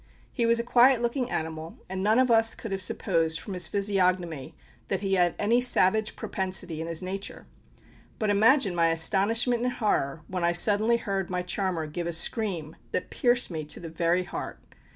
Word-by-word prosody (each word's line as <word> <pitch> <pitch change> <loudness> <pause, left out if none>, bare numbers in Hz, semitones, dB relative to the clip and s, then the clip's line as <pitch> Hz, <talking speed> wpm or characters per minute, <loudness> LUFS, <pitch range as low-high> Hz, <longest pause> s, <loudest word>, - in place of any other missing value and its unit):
He 235 -3 0
was 230 0 +3
a - - -1
quiet 245 +1 +4
looking 240 +1 -2
animal, 160 0 -5
and 190 0 -5
none 215 +3 +2
of 255 -1 +3
us 225 0 +4
could 225 - -8
have 195 0 -3
supposed 165 -3 0
from 200 - -8
his 180 -3 -1
physiognomy 180 -6 -1 0.3
that 195 - -2
he 195 -1 -1
had 175 -2 +2
any 230 +4 +2
savage 220 -3 +2
propensity 185 -4 -3
in 165 - -5
his 165 +1 -3
nature. 195 +2 -6 0.7
But 215 -2 0
imagine 215 0 +4
my 170 -1 +2
astonishment 210 +9 +2
and 250 0 -1
horror 160 - -1
when 185 -2 -4
I 170 0 +2
suddenly 215 +5 +3
heard 195 -4 -3
my 180 -1 -2
charmer 180 -3 -2
give 170 +3 -5
a 170 - -3
scream 170 -3 -2
that - - -3
pierced 240 -4 +2
me 160 -2 -4
to 150 - -7
the 165 - -8
very 170 +2 0
heart! - - -7
190 Hz, 190 wpm, -26 LUFS, 170-225 Hz, 0.7 s, quiet